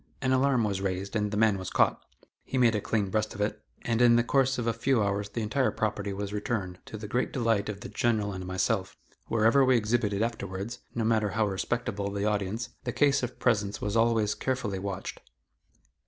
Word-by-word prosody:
An 130 -1 0
alarm 130 -2 +3
was 100 -2 -1
raised, 95 +2 -3
and 105 -1 +1
the 105 - -3
man 105 -3 +3
was 95 - -5
caught. - - +2 0.4
He 130 - -3
made 120 -3 +5
a 105 - 0
clean 100 -3 -1
breast 110 0 -1
of 105 - -5
it, 105 0 -1 0.2
and 115 -1 0
in 120 -1 +7
the 120 - +4
course 135 +1 +2
of 120 - -2
a 115 - +1
few 115 0 +1
hours 100 0 -1
the 115 +2 -3
entire 130 +5 +1
property 105 -2 -2
was 100 +1 -4
returned, 100 -4 -3
to 110 - -7
the 105 0 -7
great 120 +5 -1
delight 115 -4 +1
of 100 -1 -5
the - - -6
General 110 -4 0
and 95 -1 -5
myself. 95 0 -1 0.3
Wherever 115 +5 +4
we 130 -1 +5
exhibited 105 -2 +1
afterwards, 110 0 -4 0.2
no 115 - 0
matter 110 -2 +2
how 110 +1 +1
respectable 100 +1 -2
the 100 0 -2
audience, 105 +2 -1
the 125 - -2
case 140 +2 +3
of 125 0 -4
presents 105 -4 +1
was 105 +1 -2
always 115 -2 +3
carefully 115 -7 -2
watched. 100 0 -5
110 Hz, 210 wpm, -28 LUFS, 100-120 Hz, 0.4 s, in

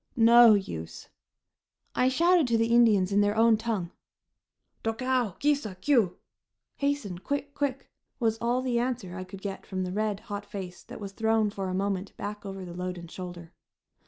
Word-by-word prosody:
No 235 -1 +8
use. 80 - -5 0.8
I 255 - +3
shouted 340 +2 +4
to 230 -1 +2
the 230 +1 +1
Indians 210 -6 +5
in 200 +1 +4
their 205 +1 +2
own 225 0 +5
tongue. 215 -6 -2 0.9
"Tokau! 240 -1 0
Ki 295 +1 +3
sa! 220 -10 -5
Kiu!" 225 -2 +2 0.6
(Hasten! 280 -11 -1
Quick! 285 +6 -3
Quick!) 275 -2 -2 0.3
was 225 -2 +1
all 240 +2 0
the 245 -2 +1
answer 235 -7 -3
I 185 - -5
could 190 +1 -11
get 195 -1 -5
from 185 -1 -3
the 180 - -3
red, 210 0 -1
hot 205 0 -6
face 190 -3 -7
that - - -10
was 200 -2 -6
thrown 220 0 +1
for 195 -2 -4
a 185 - -2
moment 195 0 -2
back 205 0 -6
over 195 -1 -6
the 175 - -8
load 180 +1 -4
and 170 -1 -10
shoulder. 175 -2 -8
210 Hz, 180 wpm, -28 LUFS, 190-240 Hz, 0.9 s, No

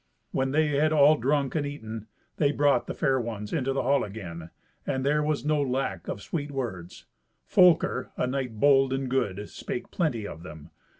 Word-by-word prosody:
When 135 0 0
they 155 +2 +2
had 150 +2 +2
all 150 0 +6
drunk 140 +1 0
and 155 - 0
eaten, 115 -6 -6 0.3
they 145 -2 +3
brought 140 -4 +2
the - - -4
fair 135 -4 +1
ones 105 -3 -5
into 135 -4 0
the 135 - -1
hall 140 +2 +2
again, 85 -6 -7 0.3
and 130 0 -2
there 150 +2 +2
was 150 -1 -1
no 150 -1 +2
lack 125 -10 -2
of 100 - -5
sweet 150 -3 -3
words. 110 -11 -5 0.4
Folker, 170 -7 +4
a - - +1
knight 125 -4 -3
bold 135 -1 +4
and 135 0 -2
good, 105 -6 -1
spake - - -6
plenty 135 - -1
of 80 - -9
them. 80 -2 -11
135 Hz, 185 wpm, -27 LUFS, 110-145 Hz, 0.4 s, all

